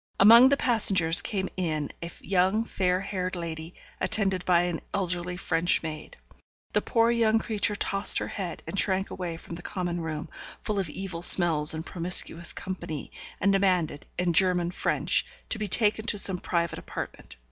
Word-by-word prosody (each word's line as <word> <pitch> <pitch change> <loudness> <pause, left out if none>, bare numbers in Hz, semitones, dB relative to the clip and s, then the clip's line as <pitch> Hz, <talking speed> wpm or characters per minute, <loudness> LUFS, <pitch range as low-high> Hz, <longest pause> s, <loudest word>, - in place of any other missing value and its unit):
Among 230 +6 +8
the 280 - +2
passengers 190 -9 +5
came 190 -3 -3
in 155 -5 -3
a 170 - -6
young, 190 +4 +1
fair 185 -4 -1
haired 185 -2 -4
lady, 165 -1 -7 0.2
attended 195 -4 +1
by 175 -1 +3
an 175 -2 -4
elderly 180 -2 -3
French 175 -1 0
maid. 155 -1 -8 0.6
The - - +2
poor 230 -1 +1
young 225 -2 +2
creature 215 -1 -2
tossed 195 0 +2
her - - -2
head, 185 -5 -6
and 200 - -4
shrank 190 0 -1
away 175 -3 -6
from 170 - -12
the 170 - -8
common 175 -1 -4
room, 155 -2 -5 0.3
full 210 -2 -3
of 185 -5 -3
evil 180 0 -7
smells 160 -4 +5
and 160 +1 -6
promiscuous 170 -1 +3
company, 175 -5 -7 0.3
and 200 0 +1
demanded, 180 -7 0
in 180 -1 0
German 175 0 +1
French, - - 0 0.3
to 220 - -1
be 210 - -3
taken 215 +2 +2
to 210 - -1
some 190 -2 +3
private 170 -2 -2
apartment. - - -9
180 Hz, 170 wpm, -26 LUFS, 170-195 Hz, 0.6 s, Among